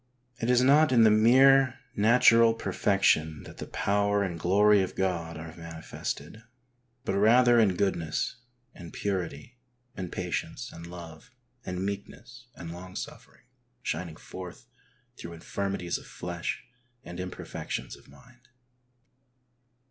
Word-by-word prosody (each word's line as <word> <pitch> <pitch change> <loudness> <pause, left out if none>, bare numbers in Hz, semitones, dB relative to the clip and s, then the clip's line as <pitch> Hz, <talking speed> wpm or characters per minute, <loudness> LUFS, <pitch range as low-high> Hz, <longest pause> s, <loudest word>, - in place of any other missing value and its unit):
It 115 - -1
is 125 0 +4
not 145 +3 +5
in 120 -3 +6
the 110 - +6
mere 130 +4 +5 0.2
natural 115 +1 +5
perfection 90 -7 +1
that - - -12
the - - -6
power 100 0 +1
and 85 -4 -4
glory 100 +4 +4
of 95 - -3
God 85 -4 -2
are 80 +1 -9
manifested, 80 +2 -7 0.6
but - - -1
rather 120 +4 +5
in 100 -5 +3
goodness 85 +1 -1 0.4
and 85 -3 -11
purity 95 - -4 0.4
and 90 -2 -5
patience 90 -2 -4
and 85 0 -10
love 85 +1 -11 0.3
and 90 +1 -4
meekness 120 +5 -7
and 85 -1 -8
long 90 +1 -10
suffering - - -9 0.4
shining 80 0 -3
forth 90 +2 -10 0.5
through 85 - -8
infirmities 90 +1 -3
of - - -15
flesh 85 -1 -5 0.4
and 85 -4 -9
imperfections 90 0 -5
of - - -20
mind. 125 0 -20
95 Hz, 125 wpm, -28 LUFS, 85-115 Hz, 0.6 s, in